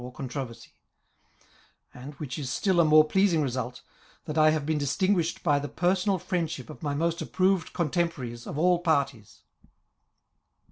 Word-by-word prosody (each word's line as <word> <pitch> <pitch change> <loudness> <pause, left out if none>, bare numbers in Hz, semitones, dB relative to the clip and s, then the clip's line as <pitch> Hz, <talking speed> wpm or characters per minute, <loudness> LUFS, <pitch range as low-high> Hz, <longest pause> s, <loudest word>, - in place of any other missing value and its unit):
or 125 - -7
contro 130 +1 -5
versy; 115 - -14 1.2
and, 135 +4 -10
which 140 -2 -6
is 135 -4 -4
still 185 +6 +1
a - - +7
more 155 0 +7
pleasing 170 -1 +2
result, 125 -2 -4 0.4
that 150 -2 -5
I 155 -1 +5
have. 155 -2 0
been 155 0 0
distinguished 175 +4 0
by 145 -4 +3
the 145 0 -5
personal 185 +2 +1
friendship 165 -6 -3
of - - -13
my 145 -3 -2
most 170 +2 -1
approved 185 -2 +1
contemporaries 150 -8 -2
of - - -5
all 175 +2 +3
parties. 140 - -1
155 Hz, 155 wpm, -27 LUFS, 135-175 Hz, 1.2 s, a